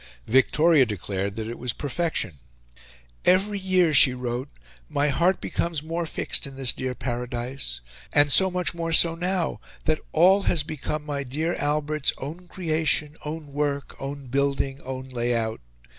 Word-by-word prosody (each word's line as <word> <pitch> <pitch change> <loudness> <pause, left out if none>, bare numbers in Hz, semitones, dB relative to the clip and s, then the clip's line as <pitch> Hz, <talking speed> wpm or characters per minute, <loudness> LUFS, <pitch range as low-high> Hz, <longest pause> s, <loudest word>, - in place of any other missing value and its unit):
Victoria 150 +5 +4
declared 100 -2 -3
that 110 -1 -4
it 120 - -6
was 125 -2 -2
perfection. 145 - -2 0.8
"Every 200 +2 +3
year," 185 -4 +2
she 130 -2 +6
wrote, 125 +2 -4 0.4
"my 145 +1 +1
heart 175 +7 +2
becomes 165 -3 -2
more 165 +1 -3
fixed 150 - 0
in 135 - -10
this 130 -2 +3
dear 130 -1 -4
paradise, 120 - -4 0.3
and 145 0 +4
so 190 +6 +7
much 180 -1 -1
more 165 -1 -3
so 165 +1 +7
now, 180 0 -1 0.3
that 155 -1 +1
ALL 185 +5 +5
has 165 -4 +2
become 150 0 -4
my 145 -2 -3
dear 155 +6 -2
Albert's 150 0 0
own 165 +7 -7
creation, 155 -4 0
own 150 -1 -6
work, 140 -1 -2
own 140 0 -6
building, 135 +1 -1
own 130 0 -6
lay 120 -1 -1
out... 110 - -2
145 Hz, 155 wpm, -25 LUFS, 130-165 Hz, 0.8 s, so